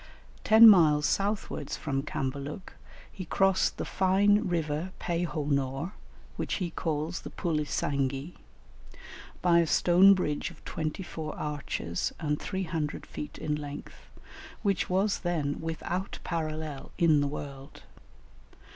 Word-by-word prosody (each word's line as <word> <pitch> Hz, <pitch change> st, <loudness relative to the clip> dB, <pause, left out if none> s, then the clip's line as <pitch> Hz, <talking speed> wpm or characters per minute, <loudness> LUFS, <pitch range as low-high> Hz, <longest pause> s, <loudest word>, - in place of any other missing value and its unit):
Ten 220 Hz, +1 st, +9 dB
miles 155 Hz, -7 st, +6 dB
southwards 200 Hz, +4 st, -1 dB
from 135 Hz, -3 st, -2 dB
Cambaluc, 140 Hz, +6 st, -5 dB, 0.4 s
he 190 Hz, -, -7 dB
crossed 195 Hz, +2 st, +2 dB
the -, -, -3 dB
fine 205 Hz, +3 st, +3 dB
river 165 Hz, +1 st, -2 dB
Pe 170 Hz, 0 st, -1 dB
ho 155 Hz, -3 st, -3 dB
nor 140 Hz, +5 st, -1 dB, 0.4 s
(which -, -, -2 dB
he 180 Hz, -4 st, -3 dB
calls 160 Hz, +2 st, -2 dB
the -, -, -7 dB
Pulisanghi), 145 Hz, -2 st, -1 dB, 1.1 s
by 170 Hz, -1 st, +5 dB
a 170 Hz, -, +2 dB
stone 180 Hz, +5 st, +6 dB
bridge 150 Hz, -5 st, -1 dB
of -, -, -17 dB
twenty 155 Hz, +4 st, -3 dB
four 160 Hz, -3 st, -6 dB
arches, 145 Hz, -, -3 dB
and 150 Hz, -2 st, -1 dB
300 165 Hz, -6 st, -3 dB
feet 150 Hz, -, -7 dB
in 150 Hz, -, -2 dB
length, 145 Hz, -1 st, -7 dB, 0.5 s
which 195 Hz, -4 st, +1 dB
was 195 Hz, +3 st, +1 dB
then 155 Hz, -5 st, -1 dB
without 170 Hz, +4 st, -3 dB
parallel 155 Hz, -3 st, -4 dB
in 160 Hz, -4 st, +4 dB
the 145 Hz, -, +1 dB
world. 140 Hz, -1 st, -8 dB
160 Hz, 125 wpm, -29 LUFS, 145-185 Hz, 1.1 s, Ten